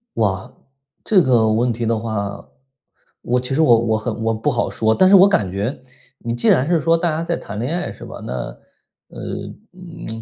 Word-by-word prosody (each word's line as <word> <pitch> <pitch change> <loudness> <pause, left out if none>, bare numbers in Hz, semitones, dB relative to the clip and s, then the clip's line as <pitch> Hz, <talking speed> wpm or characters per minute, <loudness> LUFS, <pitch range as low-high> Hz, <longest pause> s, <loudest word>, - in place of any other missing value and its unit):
哇， 95 -4 -1 0.5
这 200 -4 +4
个 120 -7 +3
问 120 +3 +1
题 115 +1 -3
的 115 0 +1
话， 100 -3 -4 0.8
我 125 +1 0
其 125 +2 -3
实 160 - +2
我 120 -7 +5
我 110 -1 0
很 110 +1 -3
我 115 0 +1
不 110 0 -1
好 - - -1
说。 110 0 +1
但 185 - +4
是 200 - +7
我 190 +1 +8
感 105 - +1
觉， 105 +8 -4 0.4
你 115 -1 -4
既 120 - +1
然 130 - +3
是 175 -2 +3
说， 165 +4 +3
大 170 +1 0
家 160 +1 -2
在 170 0 -2
谈 100 - -8
恋 135 +9 -2
爱 175 - -4
是 - - -13
吧？ - - -9
那， - - -4 0.8
呃 - - -11 0.5
嗯， 165 -11 -9
120 Hz, 225 characters per minute, -20 LUFS, 110-165 Hz, 0.8 s, 我